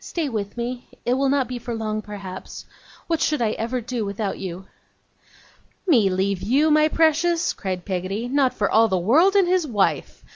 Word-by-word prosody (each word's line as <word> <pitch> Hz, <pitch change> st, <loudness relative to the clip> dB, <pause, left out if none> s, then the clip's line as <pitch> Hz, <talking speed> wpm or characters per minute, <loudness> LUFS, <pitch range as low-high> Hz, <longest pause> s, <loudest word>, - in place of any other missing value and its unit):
Stay 330 Hz, -4 st, -3 dB
with 215 Hz, -4 st, -4 dB
me. 245 Hz, +1 st, -4 dB, 0.2 s
It 245 Hz, -, +2 dB
will 270 Hz, +1 st, +1 dB
not 270 Hz, -2 st, +1 dB
be 250 Hz, -1 st, -5 dB
for 235 Hz, 0 st, -5 dB
long, 215 Hz, -1 st, -3 dB
perhaps. 195 Hz, -3 st, -8 dB, 0.4 s
What 330 Hz, -2 st, -1 dB
should 300 Hz, -, +1 dB
I 225 Hz, -3 st, +1 dB
ever 235 Hz, +3 st, -3 dB
do 240 Hz, -1 st, -3 dB
without 200 Hz, 0 st, -3 dB
you!' 185 Hz, 0 st, -6 dB, 1.2 s
'Me 235 Hz, -, +4 dB
leave 190 Hz, 0 st, -1 dB
you, 275 Hz, +10 st, +2 dB
my 305 Hz, 0 st, +5 dB
precious!' 330 Hz, +2 st, +2 dB
cried 185 Hz, -3 st, -5 dB
Peggotty. 195 Hz, +4 st, -3 dB
'Not 265 Hz, 0 st, +2 dB
for 205 Hz, -, -1 dB
all 225 Hz, +2 st, +4 dB
the 190 Hz, -3 st, 0 dB
world 305 Hz, -, +4 dB
and 390 Hz, -3 st, +4 dB
his 360 Hz, -3 st, +1 dB
wife. 210 Hz, -6 st, -1 dB
235 Hz, 185 wpm, -23 LUFS, 200-290 Hz, 1.2 s, my